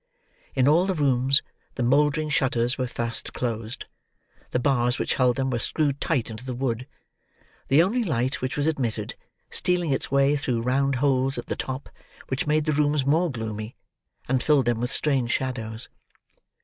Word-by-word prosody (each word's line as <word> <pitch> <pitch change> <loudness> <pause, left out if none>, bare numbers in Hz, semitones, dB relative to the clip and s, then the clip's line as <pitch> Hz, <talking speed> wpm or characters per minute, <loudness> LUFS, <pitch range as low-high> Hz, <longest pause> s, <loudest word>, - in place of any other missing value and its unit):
In 130 -1 +3
all 170 +6 +4
the 190 - 0
rooms, 135 -2 +3 0.3
the 125 - -1
mouldering 150 +4 +2
shutters 125 -4 +2
were 130 -2 -2
fast 115 -1 -3
closed: 115 -1 -3 0.6
the - - 0
bars 125 -2 +2
which - - 0
held 125 -2 +3
them 135 -1 -1
were 120 - 0
screwed 145 +1 0
tight 130 -9 0
into 110 +2 -8
the 130 -1 -4
wood; 125 -1 -2 0.8
the 145 +5 +5
only 230 +7 +1
light 130 - -1
which 130 +2 -2
was 145 - +1
admitted, 120 -9 -1 0.4
stealing 175 -4 +1
its 135 - -1
way 140 +1 +3
through 125 -5 -1
round 135 +2 +1
holes 135 0 +1
at - - -4
the - - -3
top: 130 +1 -4 0.4
which 130 +3 -2
made 150 0 +2
the 155 - +1
rooms 145 -1 +2
more 165 +5 +3
gloomy, 110 -3 -5 0.5
and 130 0 +1
filled 145 -3 +3
them 120 -1 +1
with 125 +1 -1
strange 135 -5 +1
shadows. 115 -4 -2
130 Hz, 175 wpm, -25 LUFS, 120-145 Hz, 0.8 s, the